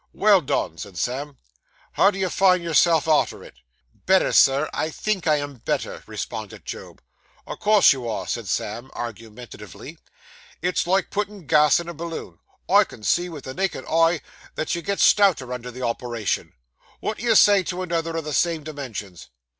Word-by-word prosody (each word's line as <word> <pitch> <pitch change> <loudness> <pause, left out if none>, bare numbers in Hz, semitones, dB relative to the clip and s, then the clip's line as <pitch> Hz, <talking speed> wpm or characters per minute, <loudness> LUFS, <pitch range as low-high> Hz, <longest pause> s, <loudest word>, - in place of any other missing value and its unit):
'Well - - +4
done!' - - -2
said 95 -3 -9
Sam. 135 - -3 0.5
'How 195 - +4
do 200 - -5
you 190 -1 -1
find 185 -2 +3
yourself 165 0 +3
arter 155 -1 +1
it?' - - -13 0.5
'Better, 190 0 +4
Sir. 140 +3 +5
I 155 - -1
think 190 +1 -2
I 155 - +4
am 145 -2 -4
better,' - - -3
responded - - -7
Job. - - -9 0.4
'O' - - -6
course 210 -5 +5
you 125 -3 -5
air,' - - -4
said 115 -4 -4
Sam 115 +8 -3
argumentatively. 115 -2 -9 0.6
'It's 180 0 -1
like 190 +1 +1
puttin' 205 -3 -4
gas 150 +3 +4
in 170 - -7
a 170 - -5
balloon. 165 - -7 0.3
I - - +6
can 110 - -14
see 175 - +1
with 155 -5 -9
the 130 - -7
naked 190 +6 -2
eye 165 -1 +2 0.3
that 155 - -2
you 170 - -2
gets 200 +3 0
stouter 175 - +4
under 125 0 -6
the 125 +1 -8
operation. 115 -2 -2 0.5
Wot 215 - -3
do - - -7
you 230 -2 +3
say 205 -1 +6
to 185 +1 -4
another 165 -2 -2
o' - - -1
the 150 -1 -6
same 165 +2 +1
dimensions? 125 - -7
155 Hz, 180 wpm, -23 LUFS, 125-180 Hz, 0.6 s, I